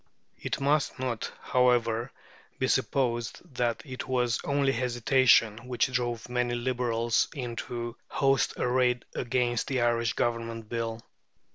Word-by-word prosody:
It - - -3
must 140 +1 +1
not, 125 -3 -3
however, 120 -2 +2 0.5
be - - 0
supposed 120 -3 0
that 120 -2 -1
it 130 -3 -6
was 125 -2 +1
only 140 -1 +2
hesitation 120 -2 +3
which 125 +1 0
drove 120 -2 -2
many 125 0 0
Liberals 120 -2 +1
into 120 -2 -4
the - - -12
host 135 -1 +2
arrayed 125 0 +1
against 120 -1 0
the 130 -3 0
Irish 115 -1 +2
Government 115 -1 -2
Bill. 115 0 -3
120 Hz, 125 wpm, -28 LUFS, 115-130 Hz, 0.5 s, hesitation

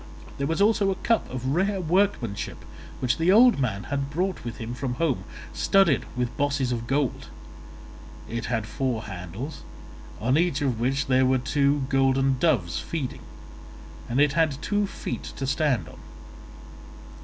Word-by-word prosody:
There 140 - 0
was 165 +6 +1
also 210 -2 +3
a 190 - 0
cup 230 +4 0
of 130 +1 -2
rare 195 +4 +1
workmanship 175 - 0 0.4
which 125 +3 +1
the 170 +3 +4
old 235 - +6
man 105 -6 -1
had 140 -1 -3
brought 180 +5 -2
with 120 - -6
him 115 +1 -5
from 125 0 -3
home, 135 - 0 0.3
studded 195 -8 +3
with 125 -1 -1
bosses 140 -3 0
of 115 -1 -3
gold; 135 -1 -1 1.0
it 115 +1 -4
had 115 -3 -1
four 115 +1 -2
handles, 95 - -7 0.6
on 130 +7 +2
each 170 -5 +1
of 125 -5 0
which 135 +4 0
there 130 0 +3
were 130 0 +3
two 140 +2 +1
golden 135 -1 +2
doves 120 - +1
feeding, 150 -6 -4 0.9
and 120 +3 0
it 145 -1 +4
had 155 -3 +1
two 205 -1 +1
feet - - -5
to 135 - -3
stand 135 -2 +1
on. - - -13
135 Hz, 155 wpm, -25 LUFS, 125-165 Hz, 1.0 s, old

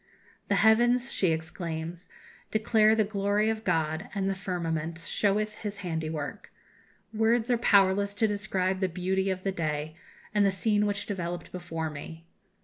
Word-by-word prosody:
"The 200 - +2
heavens," 240 +5 +4
she 190 - +2
exclaims, 160 +1 -4 0.4
"declare 220 0 +4
the 220 - +3
glory 205 +1 +1
of 220 0 -5
God, 160 +2 0
and 195 -1 0
the 195 - +1
firmament 170 -4 -3
sheweth 210 +5 0
His 210 -1 -5
handiwork. 160 -3 -4 0.6
Words 225 +2 +2
are 240 - +4
powerless 200 -2 +4
to 220 - +2
describe 190 -2 -1
the 190 -1 +1
beauty 190 +2 -1
of 185 -1 -2
the 195 - 0
day, 155 -3 -3 0.4
and 210 -1 +4
the 200 - +4
scene 210 +2 +1
which 205 0 -1
developed 175 -3 -4
before 165 -3 -4
me. 160 +3 -9
195 Hz, 150 wpm, -28 LUFS, 165-210 Hz, 0.6 s, heavens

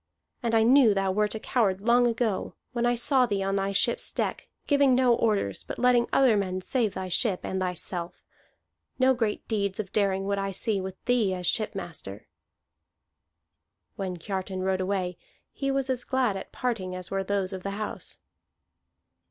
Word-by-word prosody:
And 230 -1 0
I 225 - +5
knew 240 -3 +6
thou 195 -1 +1
wert 210 +2 0
a - - -3
coward 200 -5 +1
long 240 +2 +4
ago, 230 -4 -1 0.2
when 240 0 0
I 240 - +2
saw 255 +1 +3
thee 200 -3 -1
on 195 0 0
thy 195 0 0
ship's 195 - +1
deck, - - -3 0.2
giving 280 -3 +4
no 250 -1 +4
orders, 210 - 0
but - - -7
letting 245 -1 +3
other 260 -5 +5
men 185 -2 -1
save 225 0 0
thy 190 - -4
ship 185 +2 +2
and 190 - -2
thyself. 180 -1 -4 0.7
No 260 0 +4
great 225 -4 -2
deeds 200 -3 -1
of 195 -3 -5
daring 195 -2 +1
would 200 0 0
I 195 0 -2
see 205 0 -1
with 190 0 -6
thee 225 -6 +2
as 180 -1 -5
shipmaster." 170 - -3 1.7
When 185 -2 -4
Kiartan 190 +1 -4
rode 190 0 0
away, 185 -2 -2 0.3
he 275 -1 -3
was 270 -1 0
as 255 -2 -1
glad 255 -6 +1
at 195 - -7
parting 210 -8 -2
as 185 0 -7
were 195 0 0
those 195 -1 -1
of 190 - -5
the 200 - -4
house. 215 -1 -3
200 Hz, 175 wpm, -27 LUFS, 190-240 Hz, 1.7 s, knew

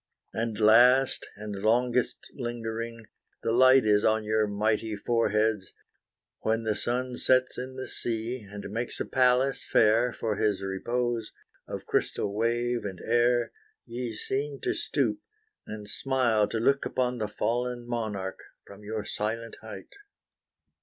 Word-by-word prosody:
And 115 -1 -2
last, 125 +5 +5
and 105 -1 -6
longest 120 +3 +1
lingering, 115 -2 -5 0.4
the 115 - +1
light 130 +1 +6
Is 105 -1 +4
on 110 0 +2
your 110 0 +1
mighty 110 +1 0
foreheads, 105 -2 0 0.7
when, 115 +1 0
the 110 -1 +1
sun 125 +3 -2
Sets 130 -1 +2
in 130 +1 -6
the 130 0 -5
sea, 115 +2 -2
and 100 0 -8
makes 115 +3 -3
a - - -1
palace 130 +1 +2
fair 115 +3 +3
For 110 -3 -3
his 100 -3 0
repose, 120 +4 -2 0.3
of - - -6
crystal 100 - -1
wave 120 +2 0
and 95 -3 -5
air, 120 +1 +2 0.3
Ye 120 -1 -4
seem 140 +4 -3
to - - 0
stoop, - - -1 0.5
and 105 -1 -7
smile 120 -3 +1
to 115 - -3
look 140 +4 +2
upon 125 -1 -1
The 105 - -1
fallen 120 +3 -2
monarch 105 -5 -3 0.3
from 100 +1 -13
your 105 0 -4
silent 115 +2 -3
height. 110 0 -10
115 Hz, 140 wpm, -28 LUFS, 105-125 Hz, 0.7 s, light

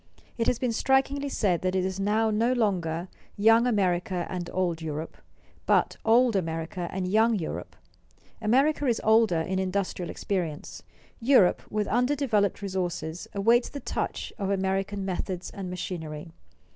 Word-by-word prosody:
It 230 - -1
has 245 - +2
been 250 -1 -1
strikingly 270 +3 +1
said 190 -9 +1
that 185 0 -1
it 185 -1 +1
is 190 0 -3
now 215 +3 +2
no 230 +4 +2
longer 180 -7 0 0.3
"young 225 +3 +5
America 185 -4 0
and 180 -2 -4
old 175 -3 -1
Europe," 155 0 -5 0.5
but - - +3
"old 235 0 +4
America 165 0 -2
and 185 -1 -2
young 220 +4 +3
Europe." 165 - -5 0.7
America 275 +6 +2
is 235 -2 +2
older 220 -6 +4
in 190 +3 -2
industrial 185 -2 -2
experience; 175 -7 -4 0.4
Europe, 235 -7 +4
with 210 0 -1
undeveloped 245 -5 +1
resources, 175 -4 -3
awaits 230 +5 +3
the 285 - -6
touch - - -4
of 195 -1 -1
American 195 0 -1
methods 185 -1 -4
and 195 -2 -6
machinery. 165 -3 -6
195 Hz, 145 wpm, -27 LUFS, 180-225 Hz, 0.7 s, young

